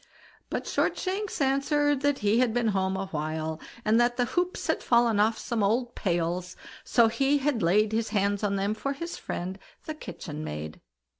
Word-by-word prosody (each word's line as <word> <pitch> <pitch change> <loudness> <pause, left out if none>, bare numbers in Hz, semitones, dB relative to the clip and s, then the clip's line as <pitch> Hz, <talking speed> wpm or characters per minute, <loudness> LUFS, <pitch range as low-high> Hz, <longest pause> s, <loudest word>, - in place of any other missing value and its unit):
But - - -3
Shortshanks 390 +2 -1
answered 280 +1 +2
that 285 -1 +2
he 210 +3 +4
had 245 -3 +2
been 240 -2 +2
home 190 -1 0
a 195 - -2
while, 155 +1 -3 0.3
and 220 +2 +4
that 240 0 +2
the 245 - +2
hoops 355 +7 -1
had - - 0
fallen 235 -3 +3
off 220 +2 +3
some 235 -2 -2
old 235 +4 +1
pails, 175 -1 -1 0.3
so 235 -2 +4
he 275 +5 +2
had 275 -4 0
laid 205 +5 +3
his 225 0 0
hands 205 -1 0
on 200 -1 +1
them 200 +2 0
for 275 +6 -3
his 335 +5 -5
friend 185 +2 -5 0.3
the 310 - -4
kitchen 155 - -7
maid. 75 - -6
220 Hz, 180 wpm, -27 LUFS, 190-270 Hz, 0.3 s, he